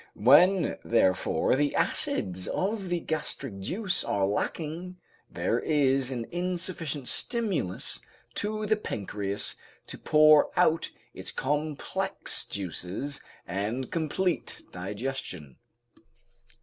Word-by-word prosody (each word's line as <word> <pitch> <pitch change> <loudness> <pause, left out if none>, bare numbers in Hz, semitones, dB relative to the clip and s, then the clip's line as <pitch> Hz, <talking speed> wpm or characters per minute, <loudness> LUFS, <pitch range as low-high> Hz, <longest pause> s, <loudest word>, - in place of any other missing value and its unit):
When 170 - +5
therefore 95 0 +3
the 145 +1 +1
acids 90 0 0
of 195 -1 -1
the 175 -1 +1
gastric 135 -8 -4
juice 185 - -1
are 100 -1 +1
lacking, 165 - -2 0.3
there - - 0
is 135 -3 +2
an 120 -3 -3
insufficient 175 -5 -1
stimulus 205 - -1 0.3
to 215 +1 -2
the 215 0 +3
pancreas 100 - -2 0.3
to - - -8
pour 155 -1 +6
out 165 +1 +3 0.2
its - - -4
complex 150 +2 -2
juices 100 - -4 0.2
and 105 +8 -2
complete 170 +2 -1
digestion. 95 - -5
145 Hz, 95 wpm, -28 LUFS, -, 0.3 s, pour